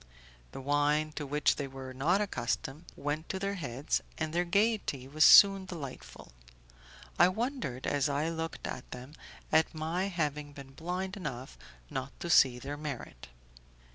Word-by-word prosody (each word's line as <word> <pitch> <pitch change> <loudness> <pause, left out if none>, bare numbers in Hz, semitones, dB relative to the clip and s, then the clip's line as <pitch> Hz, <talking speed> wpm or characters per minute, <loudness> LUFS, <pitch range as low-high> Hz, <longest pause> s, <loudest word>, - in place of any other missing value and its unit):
The - - -7
wine, 145 +2 +1
to 150 -1 -5
which 150 +2 +2
they 140 - -3
were 130 -1 -8
not 165 +10 +2
accustomed, 150 - -3
went 150 +3 -3
to 190 - -2
their 200 +1 -2
heads, 140 -6 -2 0.2
and 160 -1 -3
their 175 +1 +1
gaiety 200 - +1
was 150 +3 +2
soon 195 +1 +8
delightful. 155 -8 -9 0.9
I 175 - +8
wondered, 185 - -3
as 145 0 +1
I 145 +3 0
looked 165 -1 -4
at 125 - -6
them, 125 +4 -9 0.4
at 160 +1 +3
my 165 +5 -1
having 150 -5 -2
been 140 -1 -11
blind 180 +6 -4
enough 135 -7 -6 0.4
not 135 -1 -5
to 170 - -2
see 130 -5 +6
their 140 +4 -6
merit. 130 - -7
150 Hz, 155 wpm, -31 LUFS, 135-175 Hz, 0.9 s, soon